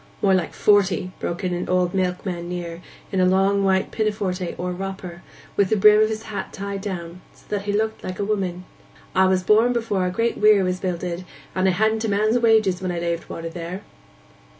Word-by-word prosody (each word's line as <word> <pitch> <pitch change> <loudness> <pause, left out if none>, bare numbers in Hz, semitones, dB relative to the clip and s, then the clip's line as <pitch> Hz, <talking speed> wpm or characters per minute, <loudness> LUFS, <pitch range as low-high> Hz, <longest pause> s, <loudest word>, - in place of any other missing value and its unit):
'More 195 -1 +5
like 185 -3 0
forty,' 195 -3 +3
broke 175 +3 -4
in 180 -1 0
an 175 - -3
old 180 0 +1
milkman 180 -2 -2
near, 175 -1 -5 0.3
in 190 - 0
a 185 - +4
long 195 +2 +3
white 190 -1 +1
pinafore 210 -3 -1 0.2
or 180 +1 -3
'wropper,' 190 +1 -5
and 170 0 -10 0.3
with 200 -2 +2
the 220 - +3
brim 210 +1 +7
of 215 - +3
his 220 0 -4
hat 215 - -5
tied 200 0 -5
down, 180 -3 -6
so - - -22
that 205 -1 -2
he 205 - 0
looked 220 +1 -1
like 185 - -5
a 200 - -1
woman. 185 -4 -2 0.5
''A 190 0 +5
was 185 -1 +1
born 220 +5 +4
before 230 -4 -1
our 180 -1 +1
Great 230 +6 -1
Weir 210 -2 +5
was 185 0 -1
builded, 180 -1 -3 0.3
and 185 0 +1
I - - +4
hadn't 220 +3 +1
man's 215 +4 +2
wages 215 -5 +3
when 185 -1 -2
I 175 - -3
laved 170 0 -3
water 165 0 -5
there. 175 +3 -6
190 Hz, 210 wpm, -23 LUFS, 180-210 Hz, 0.5 s, brim